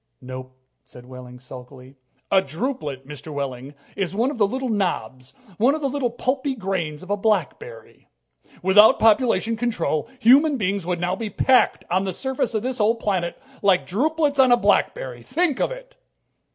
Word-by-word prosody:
"Nope," 130 0 -9 0.3
said 125 0 -15
Wehling 125 -1 -11
sulkily. 125 +1 -12 0.4
"A 190 - +5
drupelet, 150 - -5
Mr. 150 +1 -9
Wehling, 140 -1 -5 0.2
is 195 -1 -3
one 240 +6 +1
of 250 - -8
the 205 - +4
little 260 +5 -3
knobs, 130 - -3 0.2
one 260 +7 +4
of 310 - -5
the 280 - 0
little 270 -2 -1
pulpy 260 +3 -2
grains 185 -8 -3
of 185 - -8
a - - +3
blackberry," 180 - -3 0.3
said - - -33
Dr. - - -29
Hitz. - - -25
"Without 205 +4 +6
population 225 0 +3
control, 225 -8 -2
human 275 +5 +5
beings 200 -4 -2
would 180 -1 -1
now 175 +1 -1
be 220 +2 -5
packed 255 +5 +2
on 185 +2 +1
this 190 -2 -4
surface 265 -3 -2
of 215 - -1
this 255 -1 -3
old 225 +2 +2
planet 185 -6 -2 0.2
like 195 -3 +3
drupelets 290 - 0
on 260 -2 +6
a 245 - +6
blackberry! 135 - 0
Think 300 - -1
of - - +1
it!" - - -11
200 Hz, 180 wpm, -22 LUFS, -, 0.4 s, Without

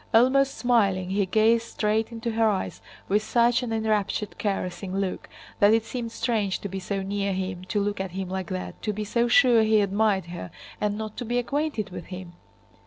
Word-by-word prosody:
Almost 270 +3 +4
smiling, 195 -7 +2
he 200 -1 +1
gazed 225 +3 +3
straight 215 +1 0
into 230 0 -3
her 225 0 +3
eyes 195 -3 -2 0.3
with 205 +2 +2
such 235 +3 +3
an 245 -2 -4
enraptured 215 -2 -1
caressing 190 -2 -2
look 195 -2 -3 0.3
that 205 +2 +6
it 225 -1 0
seemed 230 -1 -4
strange 215 -6 0
to - - -3
be 195 0 -5
so 195 +1 -3
near 200 0 -1
him, 185 -1 -4
to 205 +2 -1
look 205 -1 -1
at 190 - -3
him 190 0 -3
like 190 0 -4
that, 185 -1 -5
to 210 - -1
be 210 +1 -3
so 235 +3 +1
sure 245 -2 +6
he 220 0 +4
admired 200 -1 +2
her, 170 - -7 0.3
and 210 0 0
not 215 -1 -5
to - - -3
be 240 +1 -1
acquainted 260 -4 -1
with 170 - -7
him. 180 -2 -8
210 Hz, 200 wpm, -26 LUFS, 190-230 Hz, 0.3 s, that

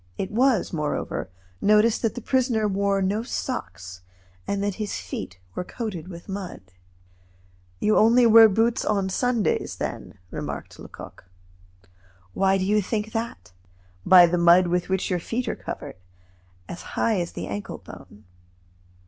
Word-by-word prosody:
It 190 +1 -3
was, 245 -3 +2
moreover, 150 - -3 0.3
noticed 215 +2 +4
that 225 - -1
the 245 - -7
prisoner 245 -5 +1
wore 200 0 0
no 200 +3 0
socks, 95 - -5 0.5
and 200 0 -1
that 205 -1 0
his 210 - -3
feet 90 - -7 0.2
were - - -3
coated 190 -6 -6
with 170 -2 -10
mud. 195 -2 -6 1.2
"You 215 - +2
only 235 +3 +5
wear 225 -1 +8
boots 225 +4 +1
on 200 -2 0
Sundays, 240 +2 0
then?" - - -6
remarked - - -6
Lecoq. - - -11 1.1
"Why 195 0 +2
do 185 - -1
you 210 +2 +2
think 215 +2 -3
that?" 225 - -5 0.5
"By 180 -1 +8
the 175 +1 0
mud 170 +2 +6
with 175 +1 -1
which 190 0 -1
your 180 - +1
feet 235 +8 -3
are - - -1
covered, - - -7 0.7
as 170 - -7 0.2
high 220 -4 +2
as 170 -1 -4
the - - -5
ankle 100 0 -5
bone." 105 - -14
200 Hz, 150 wpm, -24 LUFS, 180-225 Hz, 1.2 s, wear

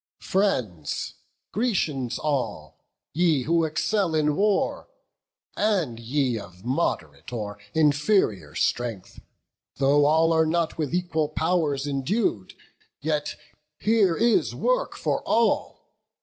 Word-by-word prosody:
"Friends, 115 - -1 0.4
Grecians 155 - -1
all, 145 -4 -3 0.3
ye 160 -4 +2
who 165 +2 +2
excel 170 +3 0
in 150 -1 +2
war, 205 +2 +1 0.7
And 185 - 0
ye 125 0 0
of 95 0 -13
mod'rate 85 - -2
or 105 -4 -5 0.2
inferior 145 - +2
strength, 115 -6 -2 0.6
Though 140 +2 +3
all 160 +2 +4
are 160 -1 +3
not 165 0 0
with 150 -4 -1
equal 170 -4 0
pow'rs 155 -4 0
endued, 140 - -1 0.5
Yet 150 0 -2 0.4
here 210 -6 +2
is 235 0 +2
work - - 0
for - - -1
all! 230 0 0
150 Hz, 105 wpm, -25 LUFS, 125-180 Hz, 0.7 s, all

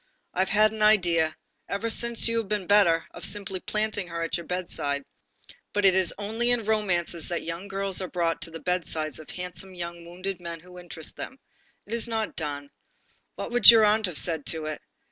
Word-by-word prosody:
I - - -4
have 190 - +2
had 215 0 +5
an 220 -1 -6
idea, 175 -7 +4 0.3
ever 200 +3 -2
since 235 +1 +2
you 230 0 0
have 225 - -4
been 210 -2 -2
better, 175 -5 +4
of - - -10
simply 195 -2 -1
planting 210 -1 -1
her 170 -1 -4
at 165 - -1
your 170 - -5
bedside, 145 -6 -2 0.7
but 205 -1 +1
it 190 - +7
is 190 -2 +3
only 220 +4 0
in 240 -3 +3
romances 180 -6 0
that 175 - -2
young 170 +4 -5
girls 195 -1 -1
are 185 - -3
brought 170 -2 -1
to - - -3
the 165 0 -8
bedsides 160 -4 -2
of 155 - -12
handsome 185 +1 -6
young 170 -1 -6
wounded 185 +2 -5
men 170 -1 -6
who 180 +1 -13
interest 165 -3 -8
them. 265 - -6 0.5
It 215 - -7
is 235 0 +2
not 220 -2 -2
done. 145 -2 -4 0.6
What - - -5
would 245 -3 +8
your 225 -2 +9
aunt 210 0 +3
have 175 -5 -5
said 160 -2 -2
to 160 -1 -1
it? 155 -1 -4
185 Hz, 205 wpm, -26 LUFS, 170-210 Hz, 0.7 s, your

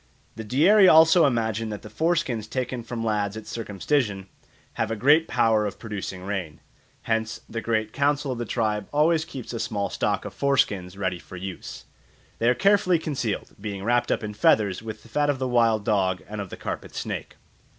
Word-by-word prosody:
The 110 - -6
Dieri 175 - +5
also 160 0 +7
imagine 115 -3 -1
that 105 -1 -6
the - - -8
foreskins 145 -4 0
taken 125 -1 -3
from 115 0 -5
lads 105 -1 -1
at 110 - -8
circumcision 105 -1 -1 0.5
have 115 - -1
a 115 - -1
great 145 +9 +4
power 110 -3 +2
of 100 - -7
producing 100 -4 -6
rain. 90 -6 -4 0.4
Hence 110 0 -1
the 115 - -4
Great 110 -2 -1
Council 145 0 +1
of 125 - -4
the 120 - -2
tribe 105 -2 -1
always 155 +2 +3
keeps 130 -5 -8
a 115 - -3
small 100 -3 -2
stock - - -1
of - - -6
foreskins 100 -10 0
ready 95 -3 -2
for 95 - -11
use. 95 0 -7 0.5
They 115 - +3
are 125 - +3
carefully 195 -1 +3
concealed, 135 -9 -3
being 100 -2 -5
wrapt 120 +2 +1
up - - 0
in 105 0 -4
feathers 105 -2 +2
with 110 -1 -8
the - - -15
fat 145 +6 0
of 145 - +1
the 130 0 -2
wild 115 -4 +2
dog 95 -3 +1
and 105 0 -5
of 100 - -7
the - - -8
carpet - - -6
snake. - - -5
115 Hz, 190 wpm, -25 LUFS, 105-135 Hz, 0.5 s, also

